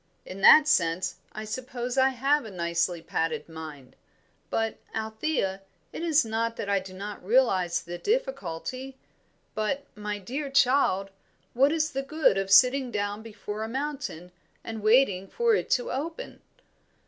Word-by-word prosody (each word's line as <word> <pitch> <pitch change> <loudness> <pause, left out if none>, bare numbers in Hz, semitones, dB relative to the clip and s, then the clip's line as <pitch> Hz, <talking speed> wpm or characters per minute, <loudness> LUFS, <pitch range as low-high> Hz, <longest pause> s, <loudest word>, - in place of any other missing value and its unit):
In 190 +1 -8
that 305 +8 +8
sense 180 - +1
I 215 - -7
suppose 245 +2 -4
I 265 0 +4
have 275 +3 +1
a 220 - -8
nicely 170 -2 -1
padded 160 -2 -2
mind; 155 -5 -10 0.5
but, 225 -1 -1 0.2
Althea, 220 -2 -2 0.3
it - - -5
is 315 -5 +3
not 230 +1 -1
that 205 - -5
I 200 -1 +2
do 190 0 -10
not 200 +1 -7
realise 190 -6 +2
the 175 +1 -7
difficulty. 265 - -3 0.6
But, 270 +7 -2
my 210 0 -4
dear 270 +9 -5
child, 255 -8 +3 0.4
what 275 +4 +4
is 310 -1 0
the 270 - -2
good 275 -7 +2
of 195 0 -3
sitting 250 +5 +6
down 205 -1 -2
before 210 -1 -7
a 220 - -4
mountain 265 - -4 0.3
and 225 -1 -6
waiting 215 -4 +3
for 470 - +1
it - - 0
to 245 - -6
open. 325 - -5
220 Hz, 150 wpm, -27 LUFS, 190-270 Hz, 0.6 s, that